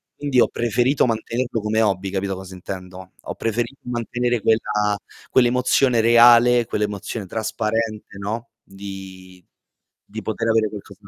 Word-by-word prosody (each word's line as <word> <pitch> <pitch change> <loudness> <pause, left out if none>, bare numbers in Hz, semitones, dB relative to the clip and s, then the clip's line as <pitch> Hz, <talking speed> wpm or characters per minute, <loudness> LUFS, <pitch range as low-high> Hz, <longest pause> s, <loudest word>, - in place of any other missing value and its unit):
quindi 140 -4 +1
ho - - +5
preferito 120 +4 +1
mantenerlo 115 0 -2
come 110 +1 +1
hobby, 95 -2 0
capito 95 0 -2
cosa 95 0 -9
intendo? 95 0 -9
Ho - - -6
preferito 120 +4 -2
mantenere 120 0 -2
quella 105 -2 +1 0.3
quell'emozione 125 -1 +3
reale, 120 +1 +6
quell'emozione 105 0 -3
trasparente, 110 0 -3
no, 110 +4 -4
di 95 -2 -10 0.6
di 110 +2 -8
poter 110 +2 -2
avere 110 -1 +3
qualcosa 105 -2 -10
da - - -14
110 Hz, 130 wpm, -22 LUFS, 100-120 Hz, 0.6 s, reale